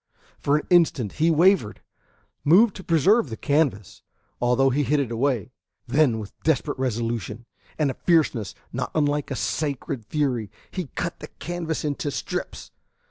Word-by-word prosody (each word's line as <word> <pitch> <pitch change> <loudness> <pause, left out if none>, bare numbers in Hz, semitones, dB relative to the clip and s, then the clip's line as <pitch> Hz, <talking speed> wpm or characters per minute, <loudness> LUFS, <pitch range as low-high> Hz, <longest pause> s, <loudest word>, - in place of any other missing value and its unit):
For 145 +1 +2
an 150 - -4
instant 155 - +3
he 165 - +5
wavered, 165 - +3 0.6
moved 195 +8 +5
to 190 - -9
preserve 170 - +3
the 110 - -6
canvas, 140 - 0 0.4
although 125 +2 +3
he 140 +4 +1
hid 145 +2 +2
it 130 -5 -2
away; 125 0 0 0.3
then 140 -6 +3
with 105 -2 -7
desperate 145 -2 0
resolution, 115 -2 -2 0.3
and 150 -3 +1
a - - -6
fierceness 145 - +1 0.2
not - - -2
unlike 145 -1 +1
a 135 - -3
sacred 140 -4 -2
fury, 125 -8 -1 0.2
he 180 -5 -4
cut 170 - -3
the - - -8
canvas 170 -3 -4
into 145 0 -2
strips. - - -5
145 Hz, 150 wpm, -24 LUFS, 120-160 Hz, 0.6 s, he